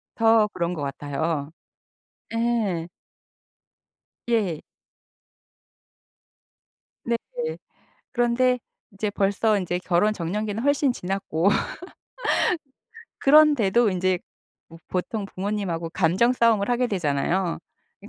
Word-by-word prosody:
더 225 -1 +4
그런 175 -2 -2
것 155 - -5
같아요. 145 +2 -3 0.8
예. 220 -8 0 1.4
예. 200 -9 0 2.4
네. 235 0 +1 1.0
그런데 250 +1 +2 0.3
이제 205 +1 -2
벌써 205 +2 +1
인제 180 -1 -2
결혼 180 +4 +2
적령기는 210 +5 -3
훨씬 285 -2 +2
지났고 190 -3 -1 1.7
그런데도 255 -7 +5
인제 185 0 +1 0.5
뭐 165 - -13
보통 195 +3 -2
부모님하고 185 -5 -3
감정 190 +10 +2
싸움을 230 -4 +2
하게 245 +1 +2
되잖아요. 175 -1 0 0.4
이 205 - -12
200 Hz, 185 characters per minute, -24 LUFS, 175-230 Hz, 2.4 s, 그런데도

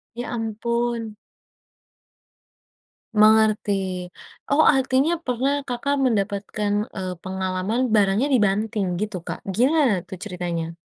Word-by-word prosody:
Ya 240 +1 -5
ampun. 235 0 -2 2.0
Mengerti, 205 -4 +3 0.4
oh 300 +2 +5
artinya 265 +2 +3
pernah 270 +2 0
Kakak, 265 +3 -1
mendapatkan, 205 -2 -1 0.2
eee, 185 -2 -3
pengalaman 190 +4 -2
barangnya 205 +5 +3
dibanting 210 -5 +1
gitu 210 -2 -3
Kak? - - -4 0.2
Gimana 270 +1 +3
tuh 190 - -7
ceritanya? 175 -4 -4
215 Hz, 95 wpm, -23 LUFS, 195-245 Hz, 2.0 s, oh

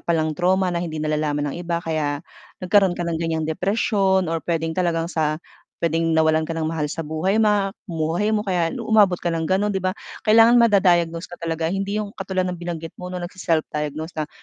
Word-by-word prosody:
palang 160 -2 +1
trauma 185 +1 +1
na 170 - -1
hindi 160 -2 -4
nalalaman 150 -1 -1
ng - - -6
iba 170 0 -1
kaya 155 -1 -2 0.4
nagkaroon 190 -1 +3
ka 175 - -2
ng 165 -1 -2
gan'yang 160 -1 -1
depresyon, 190 +2 +1
or 165 0 -1
puwedeng 165 -1 -1
talagang 170 -2 0
sa 155 -3 0 0.4
puwedeng 165 0 +1
nawalan 160 0 +3
ka 165 - -4
ng 160 -1 -2
mahal 160 -2 -2
sa - - -4
buhay, 165 +7 0
ma 205 -2 +2 0.2
buhay 165 +5 -1
mo 210 - -2
kaya 180 -4 +1 0.2
umabot 205 -5 +4
ka 170 -1 -2
ng 160 -1 -2
gano'n, 205 +2 +1
'di 190 - -1
ba? 185 +2 -1 0.3
Kailangan 230 +2 +7
mada-diagnose 175 -6 +3
ka 175 - -11
talaga 165 0 -2
hindi 195 +2 -2
yung 210 -1 -3
katulad 190 -1 -2
ng 180 -1 -4
binanggit 165 -2 -5
mo 180 - -6
'no, 180 - -5
nagse-self-diagnose 160 -3 -2
na 155 -1 -3
170 Hz, 195 wpm, -22 LUFS, 160-190 Hz, 0.4 s, Kailangan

